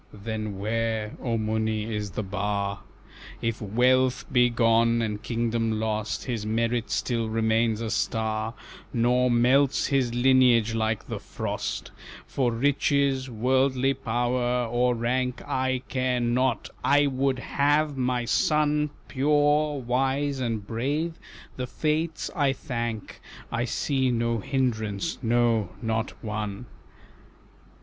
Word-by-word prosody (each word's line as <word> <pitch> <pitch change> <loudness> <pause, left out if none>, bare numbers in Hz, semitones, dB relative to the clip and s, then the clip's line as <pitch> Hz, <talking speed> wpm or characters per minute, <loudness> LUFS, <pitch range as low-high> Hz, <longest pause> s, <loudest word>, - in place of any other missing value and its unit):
"Then 110 -1 -5
where, 110 +1 -2
O 115 -2 -1
Muni, 110 0 -1
is 105 -1 -3
the 95 +4 -4
bar? 100 0 -2 0.6
If 115 -1 -2
wealth 125 +4 +2
be 125 -2 +4
gone, 115 0 +3
and 105 -2 -3
kingdom 115 -1 -1
lost, 110 -1 -2
His 115 -5 -3
merit 115 +2 0
still 115 -3 -1
remains 110 0 +1
a 110 -1 -3
star, 110 +1 -1 0.4
Nor 125 +2 +2
melts 130 +4 +3
his 135 -4 +1
lineage 120 -3 +4
like 110 -1 -1
the - - -4
frost. - - -4 0.3
For 125 -3 0
riches, 135 +1 +1
worldly 130 +3 +2
power, 125 0 0
or 120 +1 +1
rank 125 +2 -1
I 130 -1 0
care 130 -1 0
not, 120 +2 0
I 145 +1 +4
would 135 -1 0
have 145 +3 +1
my 125 -2 0
son 150 +6 +2 0.2
Pure, 145 +1 +2
wise, 135 +3 0
and 115 -5 -2
brave, 145 +10 -2 0.4
the 125 -1 -3
Fates 155 +4 -1
I 145 -5 +2
thank 120 -5 -5 0.3
I 120 0 0
see 130 +1 0
no 115 -1 0
hindrance, 110 - -1
no, 115 -4 +2
not 115 0 -1
one." 105 +1 -4
120 Hz, 120 wpm, -26 LUFS, 110-130 Hz, 0.6 s, be